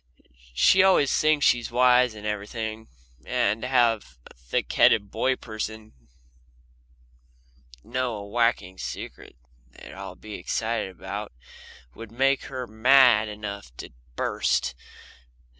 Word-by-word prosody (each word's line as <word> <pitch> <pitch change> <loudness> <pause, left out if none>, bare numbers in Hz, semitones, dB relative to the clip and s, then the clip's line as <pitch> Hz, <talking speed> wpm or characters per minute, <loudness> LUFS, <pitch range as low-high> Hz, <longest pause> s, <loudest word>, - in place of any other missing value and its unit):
She 185 - +5
always 185 -7 +4
thinks 155 -1 +2
she's 120 -2 +2
wise 125 0 +4
to 105 -1 -11
everything, 110 +1 -5 0.4
and 105 +3 0
to 125 - -3
have 115 - +1
a - - -15
thick - - -4
headed 100 0 +4
boy 130 0 0
person 110 -1 -7 1.9
know 125 -1 -2
a 100 -1 -8
whacking 100 -5 0
secret - - -8 0.3
that - - -17
they'd - - -11
all - - -8
be 110 -1 -11
excited 115 0 -2
about 90 - -7 0.6
would 115 -1 -11
make 135 +3 +1
her 130 -2 -5
mad 120 0 +5
enough 100 - -8
to - - -9 0.2
burst. 65 +2 0
110 Hz, 125 wpm, -25 LUFS, 105-125 Hz, 1.9 s, She